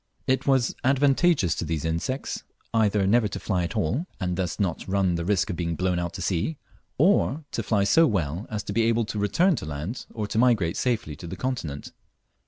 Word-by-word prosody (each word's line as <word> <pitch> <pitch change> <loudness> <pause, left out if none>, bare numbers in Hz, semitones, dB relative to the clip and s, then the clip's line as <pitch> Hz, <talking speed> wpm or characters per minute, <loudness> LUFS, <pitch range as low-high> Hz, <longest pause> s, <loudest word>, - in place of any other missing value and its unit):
It 130 +2 0
was 130 -3 +3
advantageous 135 - +3
to - - -3
these 80 -1 -2
insects 85 +12 -2 0.3
either 105 -3 +3
never 110 +3 +3
to 100 - -5
fly 95 -4 -1
at 85 - -4
all, 130 - 0
and 90 -1 -1
thus 90 -2 -2
not 95 -3 -1
run 95 -2 +1
the 85 0 -1
risk 100 +1 +1
of - - -3
being 85 -1 -2
blown 90 0 0
out 85 0 -3
to 95 0 -5
sea, 95 - -1 0.4
or 160 -3 +3
to - - -2
fly 105 -2 +1
so 160 +12 +5
well 90 - -2
as 105 -2 -3
to 100 - -5
be 115 - +2
able 115 0 +2
either 110 - -5
to 105 - -4
return 170 - +3
to - - -5
land, 80 - -5
or 110 -2 -3
to 110 - -1
migrate 110 -9 +3
safely 115 - -1
to 85 - -8
the - - -5
continent. 85 - -4
100 Hz, 215 wpm, -25 LUFS, 85-125 Hz, 0.4 s, so